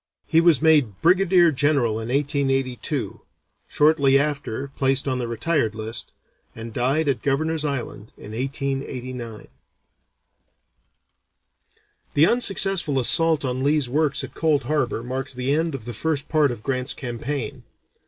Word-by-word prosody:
He 165 0 +3
was 165 -3 +3
made 145 -12 +3
brigadier 180 -1 +4
general 135 -6 +1
in 110 - -5
1882, 135 -2 -1 0.5
shortly 145 -3 +3
after 140 -2 -2
placed 135 0 0
on 130 -1 -1
the 120 - -3
retired 115 -1 -1
list, 110 +1 -4 0.4
and 115 0 -8
died 135 +7 0
at 135 -3 0
Governor's 155 +3 0
Island 130 -7 -4
in 105 - -11
1889. 130 -3 -4 2.7
The 150 - +6
unsuccessful 195 - +2
assault 160 +4 +3
on 130 0 -2
Lee's 145 -1 +2
works 150 +1 0
at - - -8
Cold 155 -4 +1
Harbor 130 -4 -1
marked 130 +2 -5
the 130 +2 -1
end 160 0 0
of 120 -5 -8
the 120 - -6
first 145 +4 -2
part 150 -2 +2
of 120 -3 -7
Grant's 130 0 -2
campaign. 120 0 -5
135 Hz, 135 wpm, -23 LUFS, 125-155 Hz, 2.7 s, The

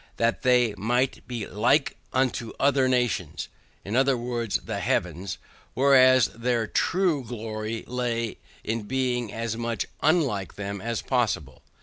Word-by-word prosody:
that 115 0 +1
they 125 -4 +3
might 120 +5 0
be 120 -4 -4
LIKE 125 +7 +2 0.2
unto 130 -3 0
other 135 -1 +3
nations, 120 -11 0 0.4
i. - - -7
e. - - -4
the 120 -4 0
Heathens, 95 +2 -1 0.4
whereas 130 -3 +6
their 115 -1 -1
true 170 - +1
glory 110 -1 -5
laid 120 -2 -2 0.3
in 115 +1 -2
being 125 -3 -1
as 115 -1 -3
much 115 -1 -2 0.2
UNLIKE 145 - +1
them 100 -1 -5
as 115 0 -3
possible. 105 - -1
120 Hz, 125 wpm, -26 LUFS, 110-130 Hz, 0.4 s, whereas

